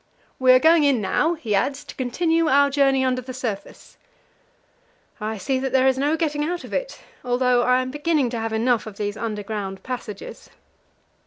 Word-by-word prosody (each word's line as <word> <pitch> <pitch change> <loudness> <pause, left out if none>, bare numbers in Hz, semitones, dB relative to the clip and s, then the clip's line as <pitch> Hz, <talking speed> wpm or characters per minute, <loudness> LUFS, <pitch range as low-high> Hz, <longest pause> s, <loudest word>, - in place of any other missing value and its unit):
"We 260 -1 +5
are - - +8
going 320 +4 +5
in 280 -4 +3
now," 315 - +1
he 235 -10 -4
adds, 270 +8 0
"to - - -10
continue 325 +6 0
our 280 -1 +4
journey 270 -2 +2
under 255 0 0
the 255 0 -8
surface." 225 -6 -6 1.2
I 215 0 -3
see 265 +6 -1
that 265 0 -3
there 260 0 +4
is 265 - +3
no 295 +3 +1
getting 300 -2 -1
out 350 +3 -3
of - - -10
it, - - -3 0.2
although 250 0 +2
I 250 +1 +2
am 255 - -6
beginning 295 -3 0
to 235 - -3
have 225 0 -3
enough 225 +1 +1
of 205 -2 -9
these 205 0 -3
underground 210 -3 -5
passages. 240 -5 -7
255 Hz, 185 wpm, -23 LUFS, 225-290 Hz, 1.2 s, are